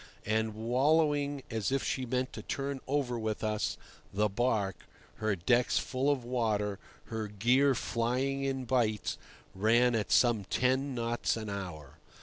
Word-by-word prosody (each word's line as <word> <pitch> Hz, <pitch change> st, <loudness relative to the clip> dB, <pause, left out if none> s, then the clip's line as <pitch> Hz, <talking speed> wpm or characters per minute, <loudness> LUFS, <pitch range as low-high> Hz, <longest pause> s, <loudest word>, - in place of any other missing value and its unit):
And, 110 Hz, 0 st, 0 dB
wallowing 145 Hz, +4 st, +2 dB
as 110 Hz, +1 st, -1 dB
if 135 Hz, 0 st, +1 dB
she 130 Hz, -1 st, -2 dB
meant 130 Hz, +2 st, -1 dB
to -, -, -6 dB
turn 140 Hz, 0 st, -3 dB
over 130 Hz, -4 st, 0 dB
with 110 Hz, -1 st, -3 dB
us, 105 Hz, -1 st, -1 dB, 0.3 s
the 105 Hz, +2 st, +1 dB
barque, 105 Hz, -3 st, -1 dB, 0.3 s
her 110 Hz, -2 st, 0 dB
decks 120 Hz, +8 st, +2 dB
full 130 Hz, +2 st, 0 dB
of 135 Hz, -4 st, 0 dB
water, 105 Hz, -5 st, 0 dB, 0.3 s
her 110 Hz, -1 st, -2 dB
gear 125 Hz, +7 st, +3 dB
flying 130 Hz, +5 st, -1 dB
in 135 Hz, -1 st, -2 dB
bights, 115 Hz, -4 st, 0 dB, 0.3 s
ran 115 Hz, +5 st, +3 dB
at 110 Hz, -2 st, -1 dB
some 115 Hz, -5 st, +4 dB
ten 130 Hz, +4 st, +1 dB
knots 115 Hz, -1 st, 0 dB
an 110 Hz, -2 st, -5 dB
hour. 90 Hz, -8 st, -7 dB
120 Hz, 145 wpm, -31 LUFS, 110-130 Hz, 0.3 s, some